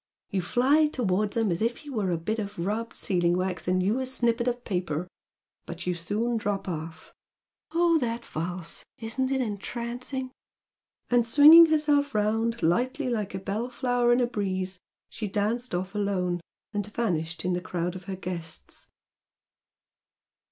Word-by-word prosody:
You 195 Hz, -2 st, 0 dB
fly 270 Hz, -, +3 dB
towards 210 Hz, -6 st, 0 dB
him 225 Hz, -4 st, +2 dB
as 170 Hz, -, -1 dB
if 235 Hz, +2 st, +1 dB
he 295 Hz, -2 st, -10 dB
were 210 Hz, -7 st, -1 dB
a 170 Hz, -, +1 dB
bit 215 Hz, +8 st, -2 dB
of 200 Hz, -1 st, -5 dB
rubbed 210 Hz, +7 st, -2 dB
sealing 175 Hz, -2 st, +1 dB
wax 185 Hz, -1 st, -2 dB
and 185 Hz, 0 st, +2 dB
you 210 Hz, +7 st, +1 dB
a 260 Hz, -, -2 dB
snippet 240 Hz, -2 st, +1 dB
of 245 Hz, 0 st, -1 dB
paper! 180 Hz, -4 st, -2 dB, 0.6 s
But 175 Hz, +1 st, -7 dB
you 180 Hz, -, +1 dB
soon 210 Hz, +8 st, -1 dB
drop 205 Hz, -3 st, -2 dB
off! 160 Hz, -2 st, -6 dB, 0.6 s
Oh, 335 Hz, 0 st, +4 dB
that 235 Hz, -2 st, -2 dB
valse! 170 Hz, +1 st, -4 dB
Isn't 245 Hz, +4 st, -2 dB
it 270 Hz, -1 st, +1 dB
entrancing!" 240 Hz, +4 st, -4 dB, 0.8 s
And, 240 Hz, -1 st, +5 dB
swinging 300 Hz, +7 st, +9 dB
herself 295 Hz, -3 st, +2 dB
round 225 Hz, +1 st, +1 dB
lightly 255 Hz, -, +1 dB
like 210 Hz, -4 st, -2 dB
a -, -, -2 dB
bell 205 Hz, +6 st, -3 dB
flower 245 Hz, -1 st, +1 dB
in 240 Hz, -, +4 dB
a -, -, +4 dB
breeze 190 Hz, -5 st, -2 dB, 0.3 s
she 215 Hz, -, -5 dB
danced 215 Hz, +3 st, -1 dB
off 185 Hz, +2 st, -3 dB
alone 185 Hz, -4 st, 0 dB, 0.3 s
and 205 Hz, -1 st, -2 dB
vanished 165 Hz, -8 st, -2 dB
in 180 Hz, -, +1 dB
the 175 Hz, -, -1 dB
crowd 175 Hz, 0 st, -3 dB
of 185 Hz, -1 st, -9 dB
her 195 Hz, -, -4 dB
guests. 175 Hz, -3 st, -6 dB
210 Hz, 160 wpm, -27 LUFS, 180-245 Hz, 0.8 s, swinging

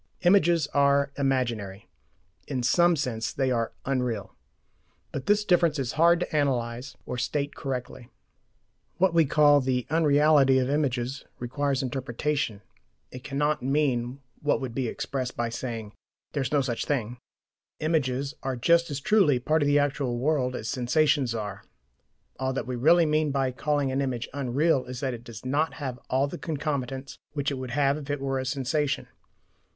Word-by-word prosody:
Images 175 Hz, -4 st, +4 dB
are 140 Hz, 0 st, +3 dB
"imaginary"; 120 Hz, -8 st, -1 dB, 0.6 s
in 125 Hz, -2 st, -2 dB
SOME 175 Hz, +7 st, +4 dB
sense 115 Hz, -7 st, -2 dB
they 135 Hz, -2 st, 0 dB
are 115 Hz, -2 st, 0 dB
"unreal." 125 Hz, -6 st, -2 dB, 0.8 s
But 135 Hz, -, -5 dB
this 210 Hz, 0 st, +3 dB
difference 170 Hz, -5 st, +3 dB
is 135 Hz, -3 st, -2 dB
hard 170 Hz, +3 st, +4 dB
to 155 Hz, -, -3 dB
analyse 125 Hz, -3 st, -1 dB
or 125 Hz, -, -4 dB
state 145 Hz, +3 st, -1 dB
correctly. 125 Hz, -2 st, -5 dB, 0.9 s
What 185 Hz, -1 st, +3 dB
we 165 Hz, -1 st, +5 dB
call 145 Hz, 0 st, +5 dB
the 125 Hz, -1 st, 0 dB
"unreality" 150 Hz, -3 st, +4 dB
of 130 Hz, +1 st, +1 dB
images 135 Hz, -2 st, -1 dB
requires 135 Hz, +2 st, -1 dB
interpretation 130 Hz, -3 st, -2 dB, 0.5 s
it 130 Hz, 0 st, -9 dB
cannot 150 Hz, +1 st, 0 dB
mean 135 Hz, -2 st, 0 dB, 0.2 s
what 150 Hz, -, +1 dB
would 130 Hz, -3 st, -5 dB
be 130 Hz, 0 st, -1 dB
expressed 130 Hz, +2 st, -4 dB
by 120 Hz, -1 st, 0 dB
saying 115 Hz, -3 st, -5 dB, 0.4 s
"there's 140 Hz, -4 st, -2 dB
no 145 Hz, -2 st, +3 dB
such 125 Hz, -3 st, -2 dB
thing." 125 Hz, -4 st, -2 dB, 0.6 s
Images 140 Hz, -3 st, 0 dB
are 135 Hz, -1 st, -2 dB
just 170 Hz, +7 st, +3 dB
as 145 Hz, -2 st, -3 dB
truly 195 Hz, -7 st, +4 dB
part 155 Hz, +6 st, +1 dB
of 145 Hz, -, +2 dB
the 145 Hz, 0 st, +4 dB
actual 140 Hz, -4 st, 0 dB
world 130 Hz, -1 st, 0 dB
as 110 Hz, -, -5 dB
sensations 130 Hz, 0 st, +1 dB
are. 105 Hz, -2 st, -5 dB, 0.8 s
All 130 Hz, 0 st, -1 dB
that 135 Hz, -, -3 dB
we 125 Hz, -, -3 dB
really 165 Hz, +7 st, +5 dB
mean 155 Hz, 0 st, +1 dB
by 135 Hz, -2 st, 0 dB
calling 145 Hz, +1 st, 0 dB
an 135 Hz, +1 st, 0 dB
image 125 Hz, -4 st, -2 dB
"unreal" 140 Hz, +1 st, +1 dB
is 125 Hz, 0 st, -6 dB
that 135 Hz, -2 st, -1 dB
it 120 Hz, -1 st, -8 dB
does 115 Hz, -1 st, -10 dB
not 145 Hz, +5 st, 0 dB
have 130 Hz, -4 st, -5 dB, 0.3 s
the -, -, -7 dB
concomitants 140 Hz, -4 st, -4 dB
which 145 Hz, -1 st, -1 dB
it 135 Hz, -, -4 dB
would 130 Hz, -1 st, -5 dB
have 140 Hz, +2 st, +2 dB
if 145 Hz, -1 st, -10 dB
it 145 Hz, 0 st, -1 dB
were 135 Hz, -1 st, -1 dB
a 130 Hz, -, -3 dB
sensation. 140 Hz, +2 st, -1 dB
135 Hz, 165 wpm, -27 LUFS, 125-150 Hz, 0.9 s, we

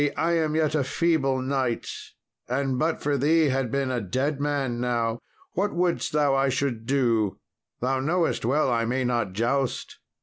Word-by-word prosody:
I 165 Hz, +2 st, +1 dB
am 160 Hz, -2 st, +1 dB
yet 155 Hz, -2 st, +1 dB
a 150 Hz, -3 st, +2 dB
feeble 135 Hz, -4 st, +1 dB
knight, 130 Hz, -3 st, -1 dB, 0.6 s
and 130 Hz, 0 st, 0 dB
but 160 Hz, +1 st, 0 dB
for 145 Hz, -1 st, +1 dB
thee 155 Hz, +2 st, +3 dB
had 130 Hz, -2 st, 0 dB
been 135 Hz, +1 st, -1 dB
a 125 Hz, -2 st, -1 dB
dead 135 Hz, +9 st, -1 dB
man 140 Hz, -5 st, -1 dB
now: 120 Hz, -2 st, 0 dB, 0.3 s
what 200 Hz, +1 st, -1 dB
wouldest 175 Hz, 0 st, 0 dB
thou 145 Hz, -2 st, +2 dB
I 135 Hz, 0 st, +2 dB
should 130 Hz, -4 st, -2 dB
do? 115 Hz, -7 st, +1 dB, 0.4 s
Thou 130 Hz, +2 st, +1 dB
knowest 165 Hz, +5 st, 0 dB
well 135 Hz, +3 st, +2 dB
I 115 Hz, -1 st, +1 dB
may 125 Hz, +3 st, 0 dB
not 120 Hz, -6 st, 0 dB
joust." 120 Hz, +5 st, -1 dB
135 Hz, 170 wpm, -26 LUFS, 125-150 Hz, 0.6 s, thee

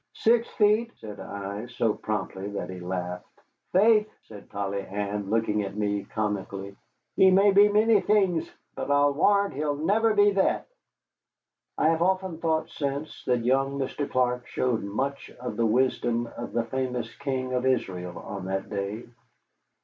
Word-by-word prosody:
"Six 230 Hz, +1 st, +3 dB
feet," 215 Hz, +2 st, +2 dB
said 105 Hz, -2 st, -9 dB
I, 100 Hz, +3 st, -6 dB
so 115 Hz, -3 st, 0 dB
promptly 105 Hz, -2 st, -4 dB
that 100 Hz, -, -4 dB
he 90 Hz, -, -7 dB
laughed. 90 Hz, 0 st, -4 dB, 0.5 s
"Faith," 215 Hz, +2 st, +4 dB
said 105 Hz, -2 st, -13 dB
Polly 100 Hz, 0 st, -3 dB
Ann, 100 Hz, 0 st, -4 dB
looking 110 Hz, -1 st, +1 dB
at 100 Hz, 0 st, -5 dB
me 105 Hz, -1 st, -1 dB
comically, 100 Hz, -2 st, -3 dB, 0.4 s
"he 190 Hz, -, +6 dB
may 195 Hz, +2 st, +5 dB
be 205 Hz, +1 st, +6 dB
many 210 Hz, 0 st, +4 dB
things, 195 Hz, -6 st, +2 dB, 0.2 s
but -, -, -5 dB
I'll 145 Hz, 0 st, +4 dB
warrant 200 Hz, +6 st, +3 dB
he'll 145 Hz, +1 st, -1 dB
never 215 Hz, +9 st, +2 dB
be 205 Hz, 0 st, +5 dB
that." 195 Hz, -1 st, +1 dB, 1.1 s
I 155 Hz, -, +3 dB
have 165 Hz, 0 st, +1 dB
often 185 Hz, -2 st, 0 dB
thought 160 Hz, -1 st, 0 dB
since 140 Hz, +1 st, -4 dB
that 125 Hz, -2 st, +1 dB
young 135 Hz, +2 st, +2 dB
Mr. 140 Hz, +1 st, -3 dB
Clark 125 Hz, -1 st, 0 dB
showed 125 Hz, -3 st, 0 dB
much 135 Hz, +8 st, -3 dB
of 125 Hz, -3 st, -5 dB
the 115 Hz, +1 st, +2 dB
wisdom 120 Hz, 0 st, +1 dB
of 120 Hz, -, -6 dB
the 115 Hz, -, 0 dB
famous 125 Hz, -1 st, -3 dB
king 130 Hz, -2 st, -2 dB
of 125 Hz, +1 st, +1 dB
Israel 90 Hz, -8 st, -1 dB
on 100 Hz, -2 st, -7 dB
that 95 Hz, +2 st, -3 dB
day. 100 Hz, +3 st, -3 dB
125 Hz, 155 wpm, -27 LUFS, 105-165 Hz, 1.1 s, he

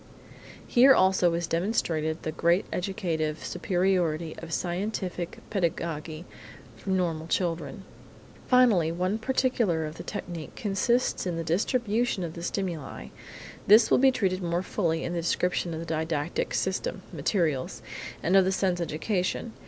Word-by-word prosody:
Here 265 Hz, +2 st, +6 dB
also 185 Hz, -2 st, +4 dB
is 170 Hz, 0 st, -1 dB
demonstrated 165 Hz, -3 st, -1 dB
the 155 Hz, -, -2 dB
great 170 Hz, +4 st, +2 dB
educative 160 Hz, -6 st, -2 dB
superiority 175 Hz, -3 st, 0 dB
of 165 Hz, 0 st, -9 dB
scientific 180 Hz, 0 st, -3 dB
pedagogy 165 Hz, -3 st, -2 dB, 0.5 s
for 110 Hz, -, -9 dB
normal 170 Hz, -4 st, 0 dB
children. 170 Hz, +1 st, -2 dB, 0.6 s
Finally, 225 Hz, -11 st, +4 dB
one 185 Hz, +5 st, -1 dB
particular 230 Hz, -9 st, +1 dB
of 155 Hz, +1 st, -7 dB
the -, -, -7 dB
technique 170 Hz, -3 st, -6 dB
consists 210 Hz, +2 st, 0 dB
in 175 Hz, -, -1 dB
the 165 Hz, -, -2 dB
distribution 215 Hz, -, 0 dB
of 165 Hz, -2 st, -4 dB
the 170 Hz, -, -8 dB
stimuli. 165 Hz, -, -4 dB, 0.6 s
This 220 Hz, +3 st, +7 dB
will -, -, +6 dB
be 270 Hz, +1 st, +6 dB
treated 190 Hz, -7 st, 0 dB
more 170 Hz, +1 st, -1 dB
fully 165 Hz, -4 st, -1 dB
in 175 Hz, -, -3 dB
the 170 Hz, -, -1 dB
description 175 Hz, +1 st, 0 dB
of 160 Hz, -, -4 dB
the 165 Hz, -, -5 dB
didactic 160 Hz, -1 st, -2 dB
system 190 Hz, 0 st, -2 dB
(materials) 155 Hz, -3 st, -1 dB, 0.4 s
and 180 Hz, -, +2 dB
of 195 Hz, -, +7 dB
the 190 Hz, -, +1 dB
sense 185 Hz, -2 st, 0 dB
education. 180 Hz, +7 st, -2 dB
175 Hz, 140 wpm, -27 LUFS, 165-195 Hz, 0.6 s, This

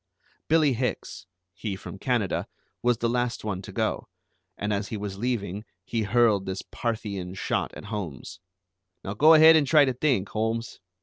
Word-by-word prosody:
Billie 155 Hz, -3 st, +4 dB
Hicks, 120 Hz, -5 st, -4 dB, 0.3 s
he 105 Hz, -4 st, -4 dB
from 95 Hz, -, -9 dB
Canada, 115 Hz, -6 st, -1 dB, 0.3 s
was 120 Hz, -1 st, +2 dB
the 115 Hz, -, 0 dB
last 120 Hz, 0 st, -1 dB
one 95 Hz, -3 st, -3 dB
to -, -, -9 dB
go, -, -, -2 dB, 0.5 s
and 105 Hz, +1 st, -1 dB
as 100 Hz, 0 st, -2 dB
he 110 Hz, -, -4 dB
was 100 Hz, -1 st, -6 dB
leaving 105 Hz, -4 st, -2 dB, 0.2 s
he 115 Hz, -, -2 dB
hurled 105 Hz, -2 st, +2 dB
this 95 Hz, 0 st, -4 dB
Parthian 100 Hz, -6 st, -4 dB
shot -, -, -1 dB
at -, -, -9 dB
Holmes: 95 Hz, -, -6 dB, 0.6 s
"Now 100 Hz, -, -4 dB
go 155 Hz, +9 st, +7 dB
ahead 160 Hz, +1 st, +8 dB
and 150 Hz, -3 st, +3 dB
try 150 Hz, 0 st, +6 dB
to 130 Hz, -, 0 dB
think, 125 Hz, -7 st, 0 dB
Holmes. 115 Hz, +1 st, -2 dB
110 Hz, 170 wpm, -26 LUFS, 100-125 Hz, 0.6 s, ahead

